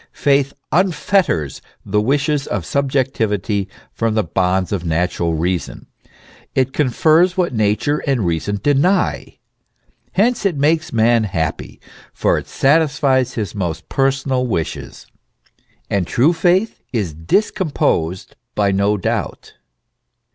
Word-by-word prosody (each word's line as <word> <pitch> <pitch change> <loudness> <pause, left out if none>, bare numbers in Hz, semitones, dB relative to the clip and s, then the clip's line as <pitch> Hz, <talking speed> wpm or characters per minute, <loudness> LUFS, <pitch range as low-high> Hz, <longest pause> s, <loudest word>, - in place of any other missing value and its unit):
Faith 140 -1 +2 0.2
unfetters 175 - +1 0.2
the 105 +1 +1
wishes 140 +4 0
of 95 -5 -3
subjectivity 115 - -1 0.2
from 115 -1 -1
the 110 - +2
bonds 95 +2 0
of 95 -4 -2
natural 85 0 0
reason; 85 +2 -2 0.7
it 130 0 +1
confers 160 +6 +3
what 175 -6 +1
nature 110 +7 +1
and 130 -7 +1
reason 85 +5 -1
deny; 150 +7 +1 0.8
hence 225 +5 +2
it 190 -7 0
makes 155 +3 +1
man 115 0 +3
happy, 80 -6 -3 0.4
for - - +1
it - - -11
satisfies 140 -3 +2
his 105 -5 -3
most 85 -5 -4
personal 135 -1 0
wishes. 85 -9 -4 0.8
And 95 -4 -1
true 145 +8 +3
faith 180 +5 +1
is 100 -10 -2
discomposed 90 - -1 0.2
by 100 -1 +2
no 100 +2 +1
doubt. 95 - -3
120 Hz, 115 wpm, -18 LUFS, 95-145 Hz, 0.8 s, confers